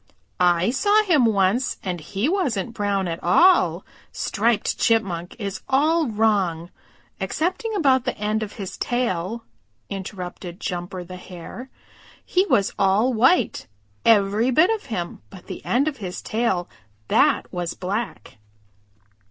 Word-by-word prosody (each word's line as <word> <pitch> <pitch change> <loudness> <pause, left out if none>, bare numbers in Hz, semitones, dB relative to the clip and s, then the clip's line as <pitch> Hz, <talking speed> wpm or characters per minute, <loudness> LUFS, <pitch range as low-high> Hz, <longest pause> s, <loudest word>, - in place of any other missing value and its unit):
"I 180 +3 +3
saw 410 +11 +3
him 315 - +3
once, 205 +4 +1
and 180 -2 -3
he 195 - -2
wasn't 250 - -1
brown 200 -3 -1
at 165 -1 -4
all. 345 - +4 0.3
Striped 225 +1 0
Chipmunk 185 -7 0
is 200 -4 -5
all 305 +4 +3
wrong, 200 -7 0 0.5
excepting 375 +7 -2
about 265 -9 +3
the - - -2
end 215 +1 -1
of 210 -2 -5
his 195 -4 -7
tail," 230 -3 -1 0.5
interrupted 185 -2 -6
Jumper 180 0 -4
the 185 +1 -9
Hare. 185 +8 -10 0.6
"He 370 +2 +2
was 200 - +2
all 200 +6 +3
white, 260 +11 +2 0.4
every 215 +2 +4
bit 315 - +4
of 440 - -6
him 175 -8 -4
but 190 -3 -13
the - - -8
end 265 +5 +1
of 295 -3 -2
his 185 -5 -6
tail, 215 -6 0 0.4
that - - +2
was 175 -2 -3
black." 190 - -4
210 Hz, 135 wpm, -23 LUFS, 185-260 Hz, 0.6 s, all